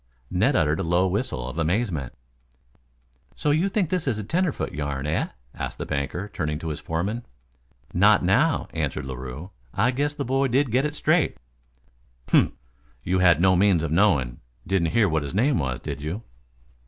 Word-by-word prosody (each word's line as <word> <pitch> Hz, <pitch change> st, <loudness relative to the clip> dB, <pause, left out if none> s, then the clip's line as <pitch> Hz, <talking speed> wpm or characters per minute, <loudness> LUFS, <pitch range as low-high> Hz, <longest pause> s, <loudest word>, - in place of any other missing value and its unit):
Ned -, -, +2 dB
uttered 75 Hz, +3 st, +2 dB
a -, -, 0 dB
low 85 Hz, +2 st, +2 dB
whistle 95 Hz, -, -2 dB
of 75 Hz, +6 st, -5 dB
amazement. 80 Hz, -, -1 dB, 1.2 s
"So 150 Hz, -, 0 dB
you 165 Hz, +7 st, +2 dB
think 190 Hz, -5 st, 0 dB
this 180 Hz, -5 st, -1 dB
is 120 Hz, -5 st, +1 dB
a 110 Hz, -, -3 dB
tenderfoot 170 Hz, -, -1 dB
yarn, 70 Hz, -1 st, -3 dB
eh?" 75 Hz, +2 st, 0 dB, 0.3 s
asked -, -, -5 dB
the -, -, -4 dB
banker, 70 Hz, +8 st, -3 dB
turning 75 Hz, -2 st, -2 dB
to 80 Hz, +1 st, -5 dB
his 75 Hz, -, -4 dB
foreman. 100 Hz, +9 st, -2 dB, 0.7 s
"Not 100 Hz, +3 st, +5 dB
now," 125 Hz, -, +2 dB
answered 75 Hz, -5 st, -2 dB
Larue. 65 Hz, +7 st, -7 dB, 0.2 s
"I 125 Hz, -, +3 dB
guess 145 Hz, +3 st, -1 dB
the -, -, -3 dB
boy 135 Hz, +2 st, +1 dB
did 130 Hz, 0 st, +1 dB
get 130 Hz, +5 st, +2 dB
it 150 Hz, -, -7 dB
straight." 155 Hz, +1 st, +2 dB, 0.9 s
"Humph! -, -, +4 dB, 0.5 s
You 95 Hz, +1 st, +1 dB
had 90 Hz, -4 st, +5 dB
no 95 Hz, +1 st, +4 dB
means 90 Hz, -3 st, +3 dB
of 80 Hz, -, -2 dB
knowing 75 Hz, -10 st, +2 dB, 0.3 s
didn't 90 Hz, -4 st, +1 dB
hear 115 Hz, -3 st, +4 dB
what 80 Hz, -3 st, +1 dB
his 70 Hz, +4 st, -5 dB
name 130 Hz, +4 st, +3 dB
was, 65 Hz, -3 st, -2 dB
did 70 Hz, -, -6 dB
you?" 85 Hz, +10 st, -4 dB
95 Hz, 180 wpm, -25 LUFS, 75-125 Hz, 1.2 s, Not